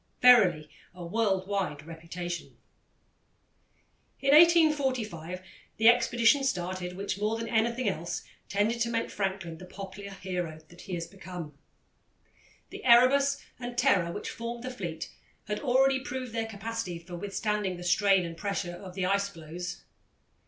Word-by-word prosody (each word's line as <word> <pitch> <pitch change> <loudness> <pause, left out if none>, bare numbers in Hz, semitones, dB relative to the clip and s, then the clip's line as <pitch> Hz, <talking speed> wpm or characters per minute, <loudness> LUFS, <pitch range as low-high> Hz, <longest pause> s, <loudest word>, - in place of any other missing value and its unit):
Verily, 195 -12 +6 0.3
a 180 -1 -8
world 190 0 +1
wide 180 -8 -2
reputation. 170 +2 -6 1.6
In 275 +1 +3
1845 265 - +4 0.3
the 225 +1 +7
expedition 240 +3 +4
started 180 -6 -2
which, 195 0 -3
more 215 +2 0
than 230 0 -4
anything 235 +2 +1
else, 175 -3 -2 0.3
tended 215 +4 +1
to 235 - +2
make 230 -1 -1
Franklin 190 -5 -3
the 185 - -9
popular 195 +1 -8
hero 180 -5 -4 0.2
he 185 - -5
has 170 -1 -3
become. 175 -4 -9 1.2
The - - -9
Erebus 275 +3 +5 0.2
and 245 -1 -6
Terror, 200 -10 +3
which - - -5
formed 235 +1 -6
the 255 - -4
fleet, 175 -9 -5 0.3
had 210 -1 -3
already 265 0 +3
proved 255 -3 -5
their 225 -1 -1
capacity 220 -3 -4
for 175 +1 -9
withstanding 205 0 -2
the 175 - -8
strain 190 +1 +3
and 165 -1 -6
pressure 180 -2 -3
of 180 +1 -10
the 190 -2 -1
ice 200 +1 +1
floes. 165 +1 -7
200 Hz, 140 wpm, -29 LUFS, 180-235 Hz, 1.6 s, the